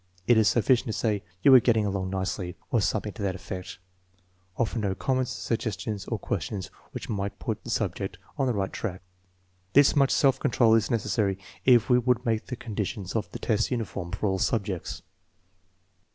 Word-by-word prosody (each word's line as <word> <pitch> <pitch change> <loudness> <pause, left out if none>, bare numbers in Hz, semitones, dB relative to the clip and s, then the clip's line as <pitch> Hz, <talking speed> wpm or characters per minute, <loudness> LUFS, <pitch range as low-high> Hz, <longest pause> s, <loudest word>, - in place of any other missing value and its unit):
'* 90 0 -32
It 120 - +5
is 110 -1 +4
sufficient 120 +2 +3
to 110 - -2
say, 105 -3 0
" 90 - -37
You 135 - +8
are 130 - +11
getting 115 -2 +2
along 95 -2 -2
nicely," 95 -1 -3 0.2
or 115 - +3
something 105 0 -1
to 110 - -9
that 95 -2 -1
effect. 90 -1 -7 0.8
Offer 115 0 0
no 100 -3 -1
comments, 130 +2 0
suggestions, 110 -3 -3
or - - -2
questions 95 -3 -4 0.2
which - - -6
might 100 -1 -3
put - - -4
the - - -8
subject - - -2 0.2
on 135 - 0
the 125 - +1
right 95 -1 -2
track. 95 -5 -4 0.7
This 145 +2 +6
much 140 -2 +4
self 135 -2 +3
control 115 -2 +3
is 115 -2 +3
necessary 105 -3 0 0.3
if 120 -3 +6
we 125 -1 +5
would 125 0 +1
make 110 -2 0
the 125 - -4
conditions 105 -4 -4
of 110 -2 -1
the - - -5
test 110 -1 0
uniform 105 -8 -3
for 95 +3 -1
all 95 -1 0
subjects. 100 -6 -2
110 Hz, 190 wpm, -27 LUFS, 95-120 Hz, 0.8 s, are